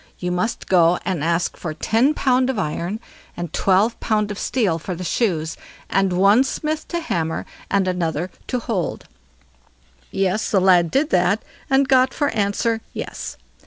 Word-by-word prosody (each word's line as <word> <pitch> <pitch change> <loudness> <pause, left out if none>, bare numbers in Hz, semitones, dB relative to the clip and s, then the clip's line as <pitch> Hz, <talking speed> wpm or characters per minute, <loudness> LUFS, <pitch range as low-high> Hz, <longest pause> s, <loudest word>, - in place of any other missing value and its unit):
You 180 0 -3
must 180 +6 -2
go 175 -1 +4
and 180 -6 -1
ask 170 +1 0
for 155 -3 -5
ten 235 - +2
pound 255 -1 +2
of 265 - -1
iron 180 +3 -2 0.4
and 175 -2 -5
twelve 200 +5 +2
pound 210 -1 0
of 205 - -6
steel 200 -10 0
for 180 +2 -5
the 180 - -6
shoes, 165 -4 0 0.4
and 195 -1 +2
one 200 +7 +5
smith 305 +3 -3
to 345 - -2
hammer 165 - -2 0.2
and 195 -1 +2
another 175 -1 -1 0.2
to 250 - -1
hold." 225 -7 -3 1.0
Yes, 195 +2 0
the 200 - +3
lad 180 -3 +4
did 285 - +1
that, 180 +4 +2 0.3
and 270 0 +3
got 260 -1 +4
for 290 -1 +1
answer 225 +2 0
"Yes!" - - -6
195 Hz, 160 wpm, -21 LUFS, 175-240 Hz, 1.0 s, one